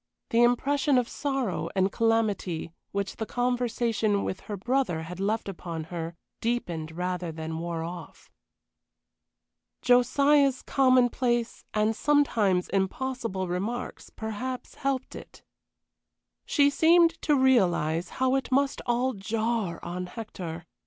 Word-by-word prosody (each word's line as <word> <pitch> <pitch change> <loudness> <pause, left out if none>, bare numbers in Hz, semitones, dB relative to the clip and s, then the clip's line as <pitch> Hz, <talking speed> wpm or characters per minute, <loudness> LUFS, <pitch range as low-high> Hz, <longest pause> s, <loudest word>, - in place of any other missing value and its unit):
The 230 - +4
impression 270 +3 +3
of 245 -2 +2
sorrow 270 -10 -2
and 190 0 +2
calamity 210 -8 0 0.2
which 200 -1 -3
the 220 - -3
conversation 240 -4 0
with 185 - -3
her 205 - -6
brother 230 -6 0
had 180 +3 -8
left 210 +3 -1
upon 170 -4 -5
her 165 0 -4 0.2
deepened 170 -9 -2
rather 180 -1 -2
than 160 0 -5
wore 170 -1 -3
off. 175 +2 -9 1.5
Josiah's 275 +2 +4
commonplace 250 -2 +2
and 215 +1 +2
sometimes 220 -11 +2
impossible 195 0 -2
remarks 205 +8 -4
perhaps 235 +4 -5
helped 270 -1 -2
it. - - -12 1.0
She 285 -1 +4
seemed 330 +2 +4
to 300 - +3
realize 180 - +2
how 260 0 +2
it 270 0 -1
must 275 +1 +1
all 245 +2 +1
jar 215 -3 -2
on 180 +1 -4
Hector. 175 -6 -7
225 Hz, 120 wpm, -27 LUFS, 180-255 Hz, 1.5 s, The